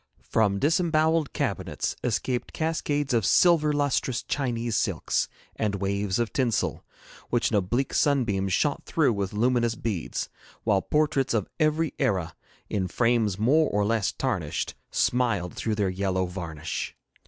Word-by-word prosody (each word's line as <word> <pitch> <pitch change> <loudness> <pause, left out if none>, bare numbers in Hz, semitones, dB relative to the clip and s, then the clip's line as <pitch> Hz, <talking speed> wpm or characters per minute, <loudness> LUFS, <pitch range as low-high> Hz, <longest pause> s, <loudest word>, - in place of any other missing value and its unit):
From 105 -3 +1
disembowelled 160 - +2
cabinets - - -2
escaped 125 +1 -1
cascades 145 -3 -1
of 115 -2 +2
silver 160 - +4
lustrous 145 -4 0
Chinese 120 -4 -2
silks - - 0 0.3
and 105 -2 -1
waves 100 0 -1
of 120 -2 -1
tinsel, 125 -5 0 0.5
which 120 -1 +1
an 110 - +3
oblique 120 +8 0
sunbeam 115 -10 +2
shot 140 - +1
through 150 -7 +2
with 100 -2 -2
luminous 120 +1 +1
beads, 105 -9 -3 0.4
while 100 -3 +2
portraits 145 -3 +1
of 105 -4 0
every 155 0 +1
era, 95 - 0 0.3
in 95 -3 -1
frames 115 -1 +1
more 145 +9 +3
or 105 0 +1
less 110 -1 +1
tarnished, - - -2 0.2
smiled 115 -8 +1
through 110 -2 -2
their 100 -2 +1
yellow 95 0 0
varnish. 85 -4 -5
115 Hz, 135 wpm, -26 LUFS, 100-145 Hz, 0.5 s, silver